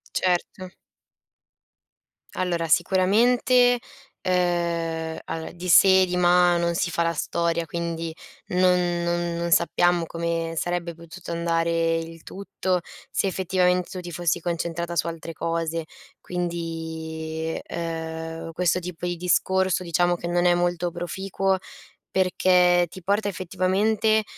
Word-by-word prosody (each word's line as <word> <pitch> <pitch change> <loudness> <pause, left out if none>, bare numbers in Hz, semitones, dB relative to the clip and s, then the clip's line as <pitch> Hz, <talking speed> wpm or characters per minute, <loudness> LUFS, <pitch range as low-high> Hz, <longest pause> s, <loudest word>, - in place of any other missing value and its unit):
Certo. 185 0 -1 1.6
Allora 175 -2 -1
sicuramente, 245 +8 +4 0.4
ehm, 170 -3 0
allora 160 0 -5
di 180 +1 -7
se 190 +3 +7
e - - +3
di 180 0 -2
ma 175 0 +4
non 170 0 0
si 175 0 0
fa 170 0 0
la 165 - +1
storia, 170 0 -1
quindi 165 0 -4 0.4
non 180 -1 +2
non 170 0 -1
non 170 0 -2
sappiamo 175 0 +3
come 165 0 -3
sarebbe 175 0 -2
potuto 170 +2 -11
andare 165 0 +1
il 165 0 -8
tutto, 185 -2 -2 0.3
se 195 - 0
effettivamen 180 -1 +1
tu 185 - -7
ti 175 -1 -8
fossi 170 0 -1
concentrata 170 0 -3
su - - +1
altre 165 0 -6
cose. 165 0 -2 0.4
Quindi, 160 -2 -4
ehm, 165 -1 -5
questo 180 +1 +1
tipo 180 0 -6
di 175 0 -2
discorso 185 +1 +1
diciamo 175 +1 +2
che 170 - -7
non 175 0 +1
è 175 - +5
molto 175 0 0
proficuo, 190 +3 -2 0.5
perché 180 -1 +3
ti 185 - -10
porta 205 +3 +1
effettivamente, 200 +4 +1
175 Hz, 125 wpm, -24 LUFS, 165-180 Hz, 1.6 s, se